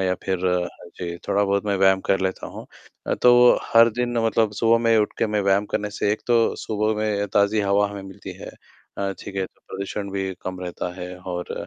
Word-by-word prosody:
या 95 -1 +1
फिर 95 -1 0 0.6
जी, 85 -1 -4
थोड़ा-बहुत 100 0 +1
मैं 100 -1 +1
व्यायाम 95 0 +4
कर 95 - +3
लेता 95 0 -2
हूँ। - - -9 0.4
अ, - - +1
तो 125 0 +6 0.2
हर 115 +1 +7
दिन 120 -1 -1
मतलब 110 -1 +1
सुबह 115 0 +4
में 115 -1 +4
उठके 105 +1 0
में 105 0 0
व्यायाम 100 +1 +2
करने 105 0 -1
से 105 - +2
एक 105 - -3
तो 115 -2 +3
सुबह 110 0 0
में 105 -1 0
ताज़ी 105 +1 +3
हवा 100 0 +2
हमें 100 -1 -7
मिलती 95 +1 -9
है - - -8 0.5
अ, 100 0 -1
ठीक - - -8
है? 95 - 0
तो - - -29
प्रदूषण 100 +1 -5
भी 95 -1 -2
कम 95 0 -5
रहता 90 0 -5
है 90 +1 -6
और 90 -1 -5
100 Hz, 205 wpm, -23 LUFS, 95-110 Hz, 0.6 s, हर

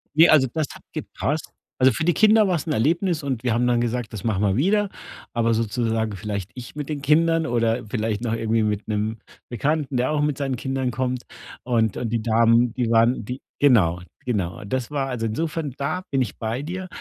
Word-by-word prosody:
Ne, 160 +2 +8
also, 140 -4 +6
das 155 -3 0
hat - - -14
gepasst. - - -3 0.3
Also, 130 +1 +6
für 135 - -2
die 175 0 +3
Kinder 215 -1 +5
war's 175 -3 -1
'n 155 - 0
Erlebnis 165 - +1
und 130 -4 -2
wir 120 -3 +1
haben 120 +1 +2
dann 120 -1 +2
gesagt, 120 -1 -2
das 100 - -6
machen 105 -3 0
wir 100 -2 +2
wieder, 200 - +2 0.4
aber 115 -1 +2
sozusagen 110 -1 -1
vielleicht 100 0 -4
ich 125 +1 -9
mit 150 -1 -5
den 150 -2 -3
Kindern 165 +3 +3
oder 115 -2 0
vielleicht 110 -1 -1
noch 120 -2 -1
irgendwie 115 0 +1
mit 105 -1 -1
'nem 110 +1 -1 0.3
Bekannten, 140 +3 -1
der 125 +4 +1
auch 150 -1 +1
mit 150 -2 0
seinen 135 -3 -2
Kindern 135 0 -2
kommt. 125 +1 -2 0.4
Und 115 -4 +1
und 115 - -2
die 115 -1 -1
Damen, 115 +1 +3
die 125 -2 -1
waren 115 0 +3
die 125 +4 -5 0.2
Genau, 90 -11 +4 0.2
genau. 95 -8 -2
Und 100 - -8
das 130 -3 -1
war 140 -2 -1
also 120 -4 -2
insofern, 150 +4 -2
da 155 +6 -2
bin 135 -2 +2
ich 110 - -7
bei 115 +3 -2
dir. 185 +4 -5
125 Hz, 210 wpm, -23 LUFS, 115-145 Hz, 0.4 s, Ne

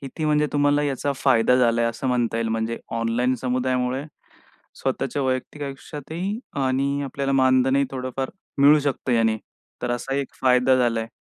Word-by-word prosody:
किती 140 +3 -5
म्हणजे 150 0 +2
तुम्हाला 145 0 +2
याचा 140 0 -1
फायदा 125 -3 +3
झाला 120 -2 +3
आहे, 115 - +2
असं 115 +3 -6
म्हणता 120 -2 0
येईल. 115 -1 -1
म्हणजे 115 +1 -2 0.2
ऑनलाईन 120 +3 +1
समुदायामुळे 130 +1 -1 0.8
स्वतःच्या 135 +1 -1
वैयक्तिक 130 +3 -2
आयुष्यातही 155 +8 -5 0.3
आणि 140 +2 0
आपल्याला 135 0 -2
मानधनही 130 +1 +3
थोडंफार 130 0 -4 0.3
मिळू 145 +2 +7
शकतं 135 -2 -1
याने. 115 -1 +3 0.5
तर 125 - -1
असा 120 +2 -2
एक 140 -1 -3
फायदा 130 0 +4
झाला 120 -3 +1
आहे 110 - -5
130 Hz, 155 wpm, -23 LUFS, 125-140 Hz, 0.8 s, मिळू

